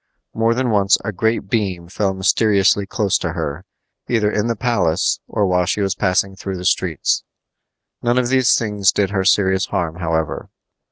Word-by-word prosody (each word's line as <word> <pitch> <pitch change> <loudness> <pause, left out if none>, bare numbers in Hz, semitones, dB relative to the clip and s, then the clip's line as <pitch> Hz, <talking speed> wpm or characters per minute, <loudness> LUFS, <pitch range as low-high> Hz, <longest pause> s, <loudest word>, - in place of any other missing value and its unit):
More 115 +1 +1
than 125 -1 0
once 100 -2 +3
a 110 - -2
great 110 +1 -1
beam 95 -5 -2
fell 95 +1 -2
mysteriously 100 0 +2
close 100 -2 0
to - - -3
her, 75 +6 -4 0.4
either 110 -3 +1
in 105 +1 -1
the 115 - -1
palace 105 -8 0
or 105 -2 0
while 90 -1 +1
she - - -1
was 95 -1 0
passing 95 +1 0
through 95 0 -5
the 90 - -7
streets. 85 -6 0 0.8
None 120 +1 +1
of 125 -1 +1
these 130 -1 +3
things 105 -3 +1
did 100 -1 0
her 95 -2 0
serious 95 0 +2
harm, 85 -3 -3
however. 80 -3 -2
100 Hz, 175 wpm, -19 LUFS, 95-110 Hz, 0.8 s, once